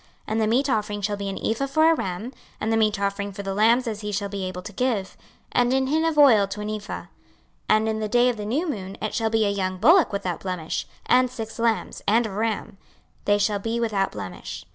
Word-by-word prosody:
26:046:005 -, -, -30 dB, 0.2 s
And 220 Hz, +1 st, 0 dB
the 215 Hz, -, +2 dB
meat 255 Hz, +6 st, +2 dB
offering 210 Hz, -2 st, -1 dB
shall 205 Hz, +1 st, 0 dB
be 200 Hz, -1 st, -3 dB
an 195 Hz, -, -4 dB
ephah 230 Hz, +5 st, 0 dB
for 315 Hz, +4 st, +4 dB
a -, -, +5 dB
ram, 210 Hz, -, -4 dB, 0.3 s
and 220 Hz, +1 st, 0 dB
the -, -, +3 dB
meat 215 Hz, -2 st, +2 dB
offering 200 Hz, 0 st, -2 dB
for 200 Hz, +1 st, -7 dB
the 195 Hz, 0 st, -3 dB
lambs 230 Hz, +5 st, +4 dB
as 220 Hz, -2 st, -4 dB
he 210 Hz, 0 st, -4 dB
shall 200 Hz, 0 st, -2 dB
be 195 Hz, -1 st, -4 dB
able 185 Hz, -1 st, -5 dB
to 205 Hz, -, -8 dB
give, 220 Hz, -4 st, -1 dB, 0.4 s
and 245 Hz, 0 st, +2 dB
an 265 Hz, 0 st, +2 dB
hin 315 Hz, +4 st, +1 dB
of 325 Hz, -2 st, 0 dB
oil 235 Hz, -9 st, +6 dB
to 200 Hz, +1 st, -6 dB
an 210 Hz, +1 st, -3 dB
ephah. 210 Hz, -1 st, -5 dB
26:046:006 -, -, -20 dB, 0.6 s
And 215 Hz, +1 st, +4 dB
in 220 Hz, 0 st, -1 dB
the 215 Hz, -1 st, -2 dB
day 245 Hz, +3 st, +4 dB
of 240 Hz, -, -2 dB
the 210 Hz, -, -5 dB
new 295 Hz, +11 st, 0 dB
moon 195 Hz, -9 st, -5 dB
it 215 Hz, -, -3 dB
shall 225 Hz, -1 st, 0 dB
be 220 Hz, -1 st, +2 dB
a 200 Hz, -, +1 dB
young 185 Hz, -2 st, -2 dB
bullock 320 Hz, -, +5 dB
without 195 Hz, -4 st, -3 dB
blemish, 180 Hz, -4 st, -3 dB, 0.2 s
and 255 Hz, 0 st, +4 dB
six 225 Hz, -2 st, -7 dB
lambs, 230 Hz, -1 st, 0 dB
and 225 Hz, +3 st, +4 dB
a 220 Hz, -, -4 dB
ram: 215 Hz, -1 st, -3 dB, 0.5 s
they 205 Hz, 0 st, +4 dB
shall 205 Hz, 0 st, +1 dB
be 225 Hz, +3 st, -2 dB
without 210 Hz, -4 st, 0 dB
blemish. -, -, -7 dB
215 Hz, 250 wpm, -24 LUFS, 200-235 Hz, 0.6 s, oil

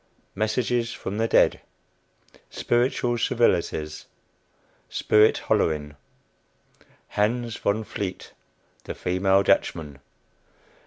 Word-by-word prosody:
MESSAGES 115 Hz, +2 st, -1 dB
FROM 100 Hz, +3 st, -5 dB
THE 115 Hz, -, +1 dB
DEAD. -, -, +3 dB, 0.9 s
SPIRITUAL 120 Hz, 0 st, 0 dB
CIVILITIES. 85 Hz, -10 st, 0 dB, 0.8 s
SPIRIT 105 Hz, 0 st, +3 dB
"HOLLERING." 75 Hz, -2 st, 0 dB, 1.1 s
HANS 115 Hz, +2 st, -1 dB
VON 105 Hz, +2 st, 0 dB
VLEET, 100 Hz, -3 st, -6 dB, 0.5 s
THE -, -, -6 dB
FEMALE 95 Hz, +2 st, +2 dB
DUTCHMAN. 75 Hz, -7 st, 0 dB
105 Hz, 75 wpm, -25 LUFS, 90-115 Hz, 1.1 s, DEAD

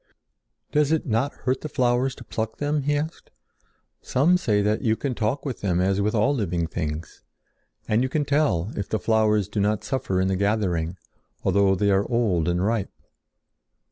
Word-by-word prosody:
"Does 150 Hz, 0 st, +2 dB
it 160 Hz, +1 st, +1 dB
not 125 Hz, +3 st, 0 dB
hurt 130 Hz, +1 st, -2 dB
the 155 Hz, -, -5 dB
flowers 130 Hz, 0 st, +1 dB
to 120 Hz, -, -11 dB
pluck 110 Hz, -1 st, -4 dB
them?" 145 Hz, 0 st, 0 dB
he 145 Hz, +1 st, +1 dB
asked. 155 Hz, +3 st, -5 dB, 0.7 s
"Some 155 Hz, +8 st, +3 dB
say 105 Hz, -, +1 dB
that 105 Hz, +1 st, +1 dB
you 110 Hz, -1 st, +2 dB
can 135 Hz, +2 st, -3 dB
talk 115 Hz, +6 st, -2 dB
with 130 Hz, -5 st, -4 dB
them 90 Hz, -3 st, +1 dB
as 95 Hz, +2 st, +1 dB
with 105 Hz, +3 st, 0 dB
all 115 Hz, +7 st, +3 dB
living 90 Hz, -9 st, -1 dB
things, 80 Hz, 0 st, -5 dB, 0.7 s
and 110 Hz, +2 st, +2 dB
you 130 Hz, -, 0 dB
can 150 Hz, +1 st, 0 dB
tell 140 Hz, -, +1 dB
if 100 Hz, -, -4 dB
the 110 Hz, -, 0 dB
flowers 105 Hz, -1 st, +2 dB
do 105 Hz, -, -3 dB
not 105 Hz, +1 st, +1 dB
suffer 115 Hz, -9 st, -1 dB
in 95 Hz, -, +2 dB
the 95 Hz, -, +1 dB
gathering, 95 Hz, -4 st, 0 dB, 0.5 s
although 95 Hz, 0 st, +3 dB
they 100 Hz, +2 st, +2 dB
are 100 Hz, +1 st, +1 dB
old 105 Hz, -9 st, +1 dB
and 90 Hz, +2 st, +1 dB
ripe." 110 Hz, -2 st, 0 dB
110 Hz, 185 wpm, -24 LUFS, 95-130 Hz, 0.7 s, Some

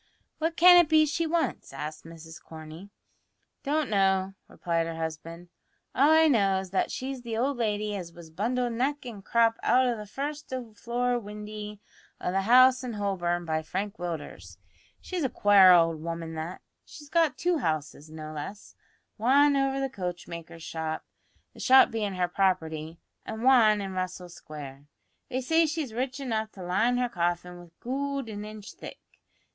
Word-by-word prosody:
"What 325 Hz, +1 st, -1 dB
can 355 Hz, +1 st, +9 dB
it 345 Hz, -3 st, +5 dB
be 310 Hz, -1 st, +5 dB
she 320 Hz, +3 st, -1 dB
wants?" 330 Hz, 0 st, -1 dB
asked 150 Hz, +3 st, -7 dB
Mrs 165 Hz, 0 st, -11 dB
Corney. 160 Hz, +4 st, -11 dB, 0.7 s
"Don't 300 Hz, 0 st, 0 dB
know," 195 Hz, -2 st, +1 dB
replied 165 Hz, -1 st, -2 dB
her 165 Hz, -, -5 dB
husband. 165 Hz, +2 st, -6 dB, 0.4 s
"All 280 Hz, +3 st, +4 dB
I 320 Hz, 0 st, +6 dB
know 200 Hz, -8 st, +3 dB
is 190 Hz, -1 st, -8 dB
that 190 Hz, -, +1 dB
she's 260 Hz, 0 st, -5 dB
the 230 Hz, -2 st, -4 dB
old 265 Hz, +3 st, 0 dB
lady 210 Hz, -2 st, -1 dB
as 175 Hz, -4 st, -6 dB
was 165 Hz, -1 st, -13 dB
bundled 240 Hz, +7 st, -1 dB
neck 270 Hz, +4 st, -1 dB
and 215 Hz, -5 st, -8 dB
crop 230 Hz, +1 st, +2 dB
out 255 Hz, +1 st, +3 dB
o' 245 Hz, -1 st, +1 dB
the 210 Hz, -1 st, -8 dB
first 290 Hz, +6 st, -5 dB, 0.2 s
floor 245 Hz, +2 st, -1 dB
windy 210 Hz, -1 st, -8 dB, 0.4 s
o' -, -, -2 dB
the 195 Hz, +1 st, +1 dB
house 255 Hz, +4 st, +6 dB
in 245 Hz, -2 st, -4 dB
Holborn 175 Hz, -4 st, -1 dB
by 160 Hz, -1 st, -1 dB
Frank 195 Hz, +6 st, -4 dB
Willders. 170 Hz, -3 st, -6 dB, 0.4 s
She's 360 Hz, -3 st, -4 dB
a 265 Hz, -, +1 dB
quare 200 Hz, -4 st, +6 dB
owld 165 Hz, -3 st, +4 dB
woman 165 Hz, 0 st, -5 dB
that. 160 Hz, +3 st, -6 dB, 0.2 s
She's 295 Hz, -, -13 dB
got 325 Hz, -2 st, +2 dB
two 350 Hz, -2 st, +1 dB
houses, 155 Hz, -, -3 dB
no 155 Hz, 0 st, -8 dB
less; 175 Hz, +7 st, -8 dB, 0.5 s
wan 280 Hz, +5 st, +4 dB
over 270 Hz, 0 st, +1 dB
the 270 Hz, -, 0 dB
coachmaker's 175 Hz, -6 st, -7 dB
shop 160 Hz, -1 st, -4 dB, 0.5 s
the -, -, -15 dB
shop 260 Hz, 0 st, +6 dB
bein' 210 Hz, -4 st, -2 dB
her 180 Hz, -1 st, +1 dB
property 165 Hz, -4 st, -1 dB, 0.3 s
an' 220 Hz, +1 st, -6 dB
wan 225 Hz, -5 st, +5 dB
in 195 Hz, -1 st, -5 dB
Russell 185 Hz, -1 st, -4 dB
Square. 145 Hz, -4 st, -10 dB, 0.4 s
They 255 Hz, -, -2 dB
say 325 Hz, +5 st, +3 dB
she's 305 Hz, -6 st, -3 dB
rich 260 Hz, +3 st, -3 dB
enough 220 Hz, -5 st, -2 dB
to 190 Hz, -, -9 dB
line 220 Hz, +8 st, +1 dB
her 250 Hz, 0 st, +1 dB
coffin 175 Hz, -3 st, -2 dB
with 170 Hz, -1 st, -17 dB
goold 275 Hz, 0 st, -3 dB
an 205 Hz, -1 st, -6 dB
inch 215 Hz, -1 st, -9 dB
thick. -, -, -10 dB
205 Hz, 170 wpm, -27 LUFS, 170-255 Hz, 0.7 s, can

